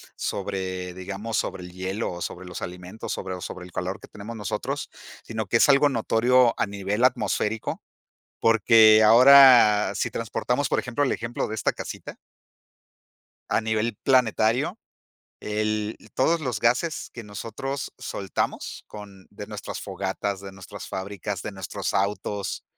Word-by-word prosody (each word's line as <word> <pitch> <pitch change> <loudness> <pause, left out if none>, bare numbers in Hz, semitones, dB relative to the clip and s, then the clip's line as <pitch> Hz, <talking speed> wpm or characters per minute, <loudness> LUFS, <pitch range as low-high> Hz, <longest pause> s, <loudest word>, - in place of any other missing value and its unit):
sobre, 95 -2 -3
digamos, 95 +5 -4
sobre 90 -2 -3
el 90 - -9
hielo, 95 +4 -3
o, 90 0 -7
sobre 90 +1 -5
los 90 -2 -7
alimentos, 90 +4 -7
sobre, 95 - -4
o, 90 - -7
sobre 90 - -7
el 90 - -13
calor 90 +3 -4
que - - -13
tenemos 105 +3 -9
nosotros, 105 -3 -3 0.4
sino 110 -2 -4
que 115 - +3
es 145 - +4
algo 145 +1 +6
notorio 120 0 +3
a - - +1
nivel 100 +3 -2
atmosférico, 115 -3 0 0.6
porque 110 -1 +6
ahora, 120 -2 +8
si 115 - -1
transportamos, 125 +4 -2
por - - +2
ejemplo, 125 +4 0
el 135 - +1
ejemplo 115 0 -3
de 110 - -4
esta 110 - 0
casita - - -7 1.3
a - - +2
nivel 110 0 -1
planetario, 130 - +2 0.6
el 105 0 -2 0.2
todos 165 +6 +2
los 125 -6 -2
gases 125 +9 0
que 120 - -8
nosotros 115 +6 -5
soltamos 95 -1 -4
con 100 -2 -11
de 105 0 -9
nuestras 105 -1 -6
fogatas, 95 0 -3
de 95 - -8
nuestras 95 -1 -10
fábricas, 95 0 -5
de - - -5
nuestros 95 -2 -4
autos, 100 +1 -2
105 Hz, 150 wpm, -25 LUFS, 95-115 Hz, 1.3 s, ahora